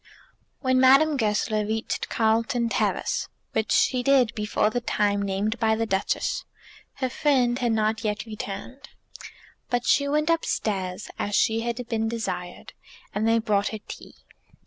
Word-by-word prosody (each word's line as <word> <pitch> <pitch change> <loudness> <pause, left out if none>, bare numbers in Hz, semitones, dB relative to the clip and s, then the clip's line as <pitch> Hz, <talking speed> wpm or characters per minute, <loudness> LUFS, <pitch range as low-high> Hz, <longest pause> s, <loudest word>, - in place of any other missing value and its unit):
When 260 -1 +2
Madame 275 +4 +6
Goesler 215 -2 0
reached 220 +1 -3
Carlton 230 +1 +1
Terrace, - - -1 0.2
which 220 -1 -1
she 255 -1 +3
did 255 -3 +3
before 210 0 0
the 245 - -1
time 205 -3 0
named 200 +3 -1
by 220 -1 +2
the 225 +1 -1
Duchess, 195 -2 -1 0.5
her 260 - -2
friend 255 -4 +2
had 240 -2 +1
not 220 +1 0
yet 210 +1 -2
returned. 220 +5 -7 0.8
But 245 -1 0
she 280 -1 +3
went 300 +3 +1
upstairs, 200 - -2
as 205 0 -1
she 225 -1 +3
had 235 +1 -3
been 225 -2 -1
desired, 185 -6 -5 0.4
and 215 +2 0
they 225 0 +4
brought 210 -3 +1
her 220 - -4
tea. - - -10
225 Hz, 145 wpm, -25 LUFS, 210-250 Hz, 0.8 s, Madame